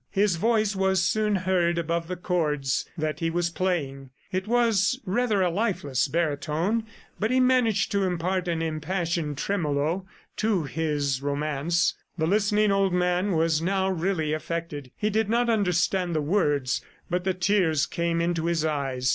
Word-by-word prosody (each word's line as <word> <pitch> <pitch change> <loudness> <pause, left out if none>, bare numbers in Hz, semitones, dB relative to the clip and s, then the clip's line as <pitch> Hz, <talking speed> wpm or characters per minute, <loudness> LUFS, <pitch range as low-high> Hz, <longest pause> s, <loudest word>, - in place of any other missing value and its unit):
His 200 -3 +1
voice 215 +1 +1
was 190 -2 +2
soon 215 0 +1
heard 180 -2 +1
above 170 0 -1
the 180 - -3
chords 150 -6 -1
that 155 -1 -2
he 165 - 0
was 170 +1 -1
playing. 145 -8 -2 0.2
It 185 0 -2
was 235 0 +2
rather 210 0 +1
a 180 - +1
lifeless 170 - 0
baritone, 165 +7 -1 0.3
but 215 - 0
he 255 +1 +2
managed 250 -5 +3
to 200 -1 +1
impart 180 +1 -1
an 165 -1 -1
impassioned 160 -1 -2
tremolo 165 +1 -1 0.3
to 215 -6 +1
his 145 -3 -1
romance. 150 +4 0 0.2
The 160 - +1
listening 210 +3 +2
old 195 -2 +2
man 180 +2 +1
was 160 -1 +2
now 190 +2 +1
really 170 -3 -1
affected; 155 -3 -4
he 210 0 0
did 220 0 +1
not 235 +1 +2
understand 180 -3 +1
the 155 - +1
words, 145 -6 +1 0.3
but 180 +1 -1
the 190 -1 0
tears 175 -6 +2
came 170 +1 -1
into 170 -1 0
his 165 -2 0
eyes. 135 -4 -1
175 Hz, 155 wpm, -26 LUFS, 155-195 Hz, 0.3 s, managed